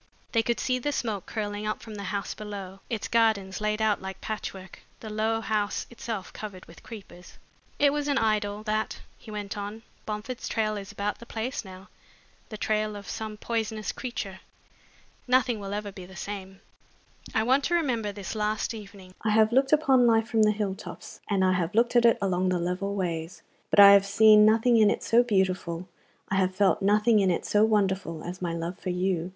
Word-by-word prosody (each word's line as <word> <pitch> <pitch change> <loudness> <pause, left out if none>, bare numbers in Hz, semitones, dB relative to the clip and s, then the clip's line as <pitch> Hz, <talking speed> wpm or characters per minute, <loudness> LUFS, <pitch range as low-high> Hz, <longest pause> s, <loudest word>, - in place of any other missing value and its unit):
They 230 - +3
could 235 +1 -1
see 255 -1 0
the 290 +4 -1
smoke 220 -8 -3
curling 210 -1 -3
up 215 - -3
from 220 - -9
the 200 -1 -6
house 200 +1 -3
below, 200 -3 -7
its 225 -4 -3
gardens 215 -4 +1
laid 215 +1 0
out 215 -2 +2
like 190 0 -7
patchwork, 190 -3 -6 0.2
the 220 - -8
low 220 +1 0
house 210 -2 -1
itself 225 -4 -6
covered 200 -4 -8
with 165 - -15
creepers. 195 -5 -12 0.4
"It 285 -1 +4
was 295 0 -1
an 285 -1 +1
idyll, 210 -2 0
that," 215 0 -2 0.2
he 225 - -13
went 205 -1 -5
on. 205 +2 -6 0.2
"Bomford's 215 +3 -5
trail 215 -1 0
is 200 -2 -7
about 205 +1 -3
the 235 - -12
place 235 +4 -3
now, 190 0 -12 0.6
the 215 - -7
trail 215 0 -1
of 200 -1 -9
some 215 -1 -5
poisonous 220 -1 -2
creature. 200 -7 -5 0.9
Nothing 250 -2 +2
will 200 -1 -6
ever 205 0 -4
be 185 -2 -10
the 190 - -13
same. 195 0 -7 0.7
I 220 - +3
want 260 +4 +3
to 345 - +1
remember 240 -10 0
this 200 -1 -6
last 215 +1 -1
evening. 195 -4 -11
I 215 - 0
have 215 +1 +4
looked 270 +1 +3
upon 270 -5 +5
life 225 -1 +3
from 225 -2 +1
the 215 0 +5
hill 205 -2 -2
tops - - -10
and 195 -2 +2
I 185 - +3
have 180 +2 -1
looked 240 +2 +3
at 240 -1 +5
it 230 - +5
along 185 -1 +1
the 185 - +1
level 180 +3 -2
ways, 170 -3 -3 0.3
but - - +2
I 200 0 +11
have 200 0 +6
seen 215 +1 +7
nothing 230 +2 +4
in 215 -2 +6
it - - -1
so 235 +1 +5
beautiful, 185 -6 0 0.4
I 190 - -1
have 185 -1 +1
felt 195 -2 +3
nothing 210 +3 +4
in 195 -2 +3
it 175 - -1
so 210 0 +3
wonderful, 190 -6 0
as 180 +2 -7
my 170 -2 -2
love 170 +2 -4
for - - -4
you. 180 -1 -1
210 Hz, 200 wpm, -27 LUFS, 190-225 Hz, 0.9 s, I